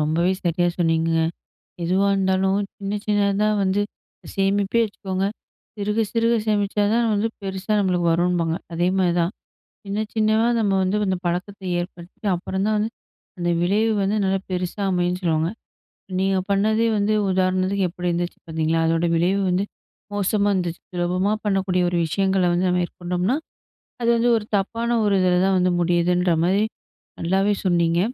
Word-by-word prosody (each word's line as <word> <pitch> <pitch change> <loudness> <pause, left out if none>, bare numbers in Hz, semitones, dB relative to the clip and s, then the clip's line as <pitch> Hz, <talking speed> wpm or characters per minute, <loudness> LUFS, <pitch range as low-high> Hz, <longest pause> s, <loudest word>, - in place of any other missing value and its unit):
ரொம்பவே 160 +4 +1
சரியா 175 +1 +2
சொன்னீங்கங்க. 165 -1 +2 0.6
எதுவா 190 +4 +2
இருந்தாலும் 190 0 +1 0.2
சின்ன 200 0 -3
சின்னதா 205 0 +2
வந்து 190 +2 +1 0.5
சேமிப்பே 200 +3 +1
வச்சுக்கோங்க, 195 -2 -3 0.5
சிறுக 210 +2 -2
சிறுக 230 0 +2
சேமிச்சா 205 -1 +1
தான், 235 0 +2
வந்து 210 +2 +1
பெருசா 195 +2 -4
நம்மளுக்கு 180 -3 +1
வரும்பாங்க. 170 -1 +1 0.2
அதேமாரி 180 +1 +2
தான் 170 +4 0 0.5
சின்ன 200 +1 -3 0.2
சின்னதா 220 +1 +2
நம்ம 200 -2 +1
வந்து 190 +3 0
அந்த 185 - +1
பழக்கத்தை 185 +2 -3
ஏற்படுத்திட்டு 175 +3 -7
அப்புறம் 190 +2 -3
தான் 215 0 +2
வந்து 220 +2 -1 0.5
அந்த 175 0 0
விளைவு 210 +5 +2
வந்து 200 +2 0
நல்லா 190 0 +1
பெருசா 180 +2 -3
அமையுன்னு 180 0 0
சொல்லுவாங்க. 160 -1 +1 0.7
நீங்க 195 0 +1
பண்ணதே 215 +3 +2
வந்து 205 +1 +1 0.2
உதாரணத்துக்கு 185 +1 +1
எப்பிடி 175 +1 -4
இருந்துச்சு 175 +1 -2
பார்த்தீங்களா! 160 0 0
அதோட 165 +1 +1
விளைவு 185 +4 +2
வந்து 185 +3 +1 0.5
மோசமா 205 +1 +1
இருந்துச்சு. 175 -2 -2
சுலபமா 180 +3 0
பண்ணக்கூடிய 190 -3 +1
ஒரு 175 - -1
விஷயங்கள 190 +3 +1
வந்து 180 +1 +1
மேற்கொண்டம்ன்னா, 180 +6 -1 0.7
அது 235 - +2
வந்து 240 +1 +2
ஒரு 210 - -5
தப்பான 230 +4 -1
ஒரு 200 -1 +3
இதில 180 -1 +3
தான் 195 -1 +2
வந்து 180 0 +2
முடியுதுன்றமாரி, 175 +2 +2 0.6
நல்லாவே 195 +4 +2
சொன்னீங்க. 170 -1 +2
190 Hz, 140 wpm, -22 LUFS, 175-200 Hz, 0.7 s, ஒரு